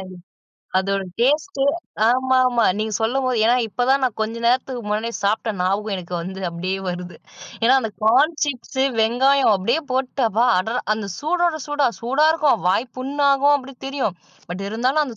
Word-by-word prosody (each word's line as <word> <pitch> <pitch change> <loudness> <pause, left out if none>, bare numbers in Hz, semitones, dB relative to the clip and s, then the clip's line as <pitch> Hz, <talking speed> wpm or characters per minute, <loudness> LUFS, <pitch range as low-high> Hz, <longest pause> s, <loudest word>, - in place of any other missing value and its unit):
அது 185 -1 -9 0.7
அதோட 195 +1 -1 0.2
டேஸ்ட்டு 295 +4 +1 0.5
ஆமாமா 255 -1 +2
நீங்க 215 0 -2
சொல்லும்போது 255 +1 0
ஏன்னா 235 +2 +4
இப்பதான் 255 +5 +1
நா - - +3
கொஞ்ச 220 +1 -1
நேரத்துக்கு 255 0 0
முன்னாடியே 215 +3 -2
சாப்பிட்ட 215 +3 0
ஞாபகம் 200 +3 0
எனக்கு 180 -1 -7
வந்து 190 +2 -7
அப்படியே 180 +3 -3
வருது. 180 0 -6 0.5
ஏன்னா 240 +3 +5
அந்த 225 -3 -4
கார்ன் 275 +9 +4
சிப்ஸு, 265 -1 -2 0.2
வெங்காயம் 255 +3 +3
அப்படியே 235 +11 0
போட்டு 260 0 -1
அப்பா! 225 +3 +1
அடறா 225 +6 -1
அந்த 215 -2 -5
சூடோட 340 +1 0
சூடா. 290 -1 +1
"சூடா 270 +6 +2
இருக்கும், 305 - +1
வாய் 230 +7 0
புண்ணாகும்." 280 +1 +2
அப்படீன்னு 270 -1 -11
தெரியும். 265 -10 -2 0.3
பட் 180 +2 -5
இருந்தாலும் 255 +8 +1
அந்த 245 -5 -8
245 Hz, 155 wpm, -21 LUFS, 215-275 Hz, 0.7 s, ஏன்னா